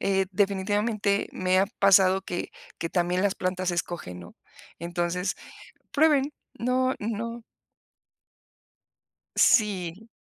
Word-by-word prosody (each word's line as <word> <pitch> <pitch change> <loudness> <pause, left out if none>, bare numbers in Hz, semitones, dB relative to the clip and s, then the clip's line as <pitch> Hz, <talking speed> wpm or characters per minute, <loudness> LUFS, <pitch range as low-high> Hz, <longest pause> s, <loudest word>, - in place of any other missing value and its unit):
eh, 195 -1 +1
definitivamente 200 +1 0
me 185 0 +1
ha 195 - +3
pasado 190 -1 +5
que 175 -2 -4 0.3
que 165 - -3
también 180 +1 0
las 200 -1 +1
plantas 185 0 -2
escogen, 170 - -4
¿no? 85 - -13 0.4
Entonces, 175 +2 -2 0.6
prueben, 295 -2 +3 0.3
no, 255 +3 +1
no 230 +2 -4 1.9
sí. 200 -2 +2
195 Hz, 100 wpm, -26 LUFS, 180-215 Hz, 1.9 s, pasado